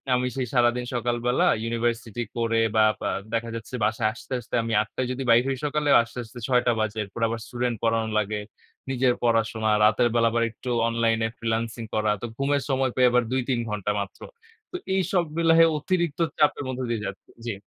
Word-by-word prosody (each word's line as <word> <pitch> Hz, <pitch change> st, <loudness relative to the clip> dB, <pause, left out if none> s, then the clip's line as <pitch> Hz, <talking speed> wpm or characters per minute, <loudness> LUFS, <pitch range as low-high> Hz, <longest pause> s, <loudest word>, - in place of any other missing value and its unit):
আমি 125 Hz, 0 st, 0 dB
সেই 130 Hz, -2 st, -2 dB
সারাদিন 120 Hz, 0 st, +2 dB
সকালবেলা 120 Hz, +1 st, +1 dB, 0.2 s
ইউনিভার্সিটি 115 Hz, 0 st, -2 dB
করে 115 Hz, -1 st, +1 dB
বা 110 Hz, 0 st, +6 dB, 0.2 s
বা -, -, -1 dB, 0.2 s
দেখা 115 Hz, 0 st, -1 dB
যাচ্ছে 115 Hz, +2 st, -6 dB
বাসায় 110 Hz, 0 st, +1 dB
আসতে, 130 Hz, -, -9 dB
আসতে 120 Hz, -, -6 dB
আমি 115 Hz, 0 st, -2 dB
৮ঃ০০ 105 Hz, -, -5 dB
টায় 130 Hz, -, -1 dB
যদি 130 Hz, +1 st, -3 dB
বাইর 115 Hz, +1 st, +6 dB
হই 135 Hz, -, -1 dB
সকালেই 150 Hz, 0 st, +2 dB
আসতে, 115 Hz, -, -13 dB
আসতে 115 Hz, +2 st, -11 dB
৬ঃ০০ 125 Hz, -2 st, +3 dB
টা -, -, +5 dB
বাজে। 110 Hz, 0 st, -1 dB
এরপর 100 Hz, +3 st, -9 dB
আবার 115 Hz, 0 st, -3 dB
স্টুডেন্ট 120 Hz, -1 st, -2 dB
পড়ানো 115 Hz, -1 st, +1 dB
লাগে। 105 Hz, 0 st, -2 dB, 0.5 s
নিজের 130 Hz, -1 st, +2 dB
পড়াশোনা, 115 Hz, -1 st, +1 dB, 0.2 s
রাতের 110 Hz, +3 st, +3 dB
বেলা 115 Hz, -1 st, +4 dB
আবার 115 Hz, 0 st, +1 dB
একটু 125 Hz, -, -8 dB, 0.2 s
অনলাইনে 115 Hz, -1 st, +1 dB
ফ্রিল্যান্সিং 115 Hz, 0 st, -2 dB
করা। 110 Hz, -1 st, +2 dB
তো -, -, -3 dB
ঘুমের 140 Hz, +1 st, +1 dB
সময় 130 Hz, -1 st, +1 dB
পাই 130 Hz, -, +4 dB
আবার 125 Hz, 0 st, +3 dB
২-৩ 130 Hz, -1 st, 0 dB
ঘন্টা 105 Hz, -1 st, -2 dB
মাত্র। 100 Hz, -1 st, -6 dB, 0.5 s
তো -, -, -7 dB, 0.2 s
এইসব 185 Hz, -1 st, +1 dB
মিলায়ে 165 Hz, 0 st, +6 dB
অতিরিক্ত 175 Hz, -1 st, -1 dB, 0.2 s
চাপের 150 Hz, -1 st, +2 dB
মধ্যে 130 Hz, 0 st, -3 dB
দিয়ে 115 Hz, -3 st, -2 dB
যাচ্ছি। 100 Hz, -, -9 dB, 0.2 s
জি। 120 Hz, -, -2 dB
120 Hz, 190 wpm, -25 LUFS, 115-130 Hz, 0.5 s, বা